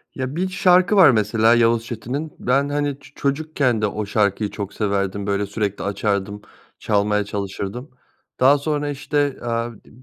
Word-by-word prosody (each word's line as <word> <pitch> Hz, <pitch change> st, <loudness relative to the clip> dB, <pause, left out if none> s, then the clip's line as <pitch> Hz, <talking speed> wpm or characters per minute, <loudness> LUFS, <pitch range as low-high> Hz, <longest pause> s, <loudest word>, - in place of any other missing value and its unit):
Ya, 130 Hz, +2 st, -4 dB
bir 185 Hz, +2 st, -1 dB
şarkı 185 Hz, +1 st, +3 dB
var 185 Hz, -9 st, +8 dB
mesela 110 Hz, +1 st, +3 dB
Yavuz 115 Hz, -1 st, +2 dB
Çetin'in. 130 Hz, +7 st, -5 dB
Ben 135 Hz, +3 st, +1 dB
hani 145 Hz, -1 st, -1 dB
ço -, -, -17 dB
çocukken 140 Hz, -5 st, 0 dB
de 105 Hz, -, +2 dB
o 105 Hz, +1 st, -4 dB
şarkıyı 100 Hz, 0 st, 0 dB
çok 100 Hz, -2 st, -6 dB
severdim. 100 Hz, -1 st, -2 dB
Böyle 100 Hz, 0 st, 0 dB
sürekli 100 Hz, 0 st, -3 dB
açardım, 100 Hz, 0 st, -2 dB, 0.4 s
çalmaya 105 Hz, 0 st, +1 dB
çalışırdım. 100 Hz, +5 st, -5 dB, 0.5 s
Daha 135 Hz, +3 st, +6 dB
sonra 145 Hz, 0 st, -2 dB
işte, 145 Hz, 0 st, -1 dB
aaa, 115 Hz, 0 st, -2 dB, 0.2 s
d -, -, -18 dB
115 Hz, 155 wpm, -21 LUFS, 105-145 Hz, 0.5 s, var